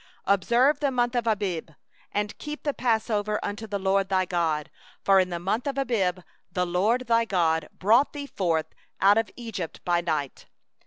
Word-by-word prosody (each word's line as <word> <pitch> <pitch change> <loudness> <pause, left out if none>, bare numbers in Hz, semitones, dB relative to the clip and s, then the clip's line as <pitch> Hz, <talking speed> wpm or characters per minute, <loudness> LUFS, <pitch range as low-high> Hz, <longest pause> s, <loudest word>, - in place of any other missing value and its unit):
Observe 240 - +3
the 285 - +1
month 245 -1 0
of 240 -2 -1
Abib, 195 -7 -1 0.4
and 205 0 -2
keep 300 0 -6
the 290 - 0
passover 215 -4 0
unto 210 +2 -4
the 205 -1 -2
LORD 195 0 +1
thy 185 -1 +2
God; 165 -4 -1 0.3
for 195 -1 +6
in 185 -1 +2
the 175 - -3
month 200 +9 -2
of 275 -1 -2
Abib 195 -9 0 0.3
the 180 +1 0
LORD 210 +9 +1
thy 230 -1 +3
God 165 -7 +1
brought 230 +8 +3
thee 290 -1 -6
forth 170 - -1 0.3
out 200 +3 +5
of 225 -3 -2
Egypt 220 -9 -6
by 175 -1 +2
night. 155 -5 -3
205 Hz, 175 wpm, -26 LUFS, 180-235 Hz, 0.4 s, for